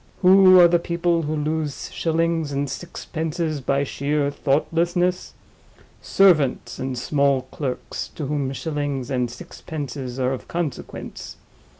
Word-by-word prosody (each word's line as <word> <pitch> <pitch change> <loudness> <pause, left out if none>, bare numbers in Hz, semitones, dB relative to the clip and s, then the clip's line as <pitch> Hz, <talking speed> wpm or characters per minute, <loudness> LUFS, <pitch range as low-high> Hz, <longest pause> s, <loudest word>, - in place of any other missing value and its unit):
Who 185 0 +8
are 175 - +9
the 170 0 +3
people 170 0 0
who 155 0 -2
lose 150 -1 -3
shillings 165 -2 0
and 140 0 -1
sixpences 160 -1 -4
by 140 +2 +1
sheer 145 +1 -1
thoughtlessness? 170 +6 0 0.7
Servants 165 -9 +3
and 130 -1 -3
small 140 0 +1
clerks, 130 -4 -4
to 150 - -4
whom 140 -1 -1
shillings 145 -3 -3
and 125 -2 0
sixpences 140 -4 -7
are 130 0 +1
of 130 - -7
consequence. 170 -4 -5
150 Hz, 120 wpm, -23 LUFS, 140-170 Hz, 0.7 s, are